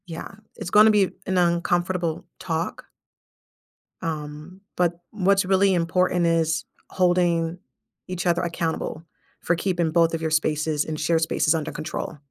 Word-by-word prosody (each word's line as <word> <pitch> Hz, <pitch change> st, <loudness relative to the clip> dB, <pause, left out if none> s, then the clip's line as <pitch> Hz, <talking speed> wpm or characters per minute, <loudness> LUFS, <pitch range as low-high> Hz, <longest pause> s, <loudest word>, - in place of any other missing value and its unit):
Yeah, 165 Hz, -1 st, -7 dB, 0.2 s
it's -, -, -6 dB
gonna 215 Hz, +3 st, +7 dB
be 205 Hz, -3 st, +3 dB
an 190 Hz, 0 st, 0 dB
uncomfortable 175 Hz, -1 st, 0 dB
talk 165 Hz, 0 st, -3 dB, 1.2 s
um, 155 Hz, +2 st, -6 dB
but 175 Hz, -1 st, +1 dB
what's 195 Hz, -2 st, +2 dB
really 190 Hz, +1 st, +3 dB
important 175 Hz, +1 st, +1 dB
is 165 Hz, -1 st, +1 dB, 0.2 s
holding 175 Hz, -2 st, +1 dB, 0.5 s
each 180 Hz, -1 st, -4 dB
other 175 Hz, 0 st, +2 dB
accountable 165 Hz, -2 st, -3 dB, 0.4 s
for 170 Hz, -, +1 dB
keeping 175 Hz, -2 st, 0 dB
both 165 Hz, 0 st, +3 dB
of 165 Hz, -, -2 dB
your 160 Hz, -1 st, -1 dB
spaces 155 Hz, -1 st, +1 dB
and 155 Hz, -1 st, -4 dB
shared 160 Hz, +1 st, +1 dB
spaces 160 Hz, 0 st, +2 dB
under 155 Hz, -1 st, -3 dB
control. 155 Hz, 0 st, -5 dB
170 Hz, 135 wpm, -24 LUFS, 160-180 Hz, 1.2 s, gonna